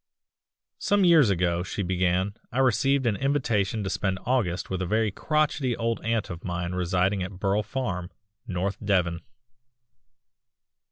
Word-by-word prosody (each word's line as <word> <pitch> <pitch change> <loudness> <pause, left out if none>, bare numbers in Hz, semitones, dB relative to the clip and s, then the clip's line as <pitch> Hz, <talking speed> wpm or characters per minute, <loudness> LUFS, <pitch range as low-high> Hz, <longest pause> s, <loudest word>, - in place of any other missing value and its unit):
"Some 205 -1 +2
years 160 -9 +6
ago," 85 -2 +1
she 95 +3 -3
began, 90 +2 0 0.2
"I 120 - -5
received 135 +1 +3
an 110 -3 +2
invitation 115 -6 0
to 95 - -2
spend 95 -2 -1
August 110 -9 0
with 95 -1 -3
a - - 0
very 110 +2 +1
crochety 150 - 0
old 115 0 -1
aunt 115 -3 -1
of 85 0 -7
mine 90 0 -3
residing 90 +2 +1
at 90 +2 -4
Burle 100 +1 +1
Farm, 105 -6 -3 0.4
North 95 +1 -3
Devon. 90 -4 +1
100 Hz, 145 wpm, -26 LUFS, 90-120 Hz, 0.4 s, years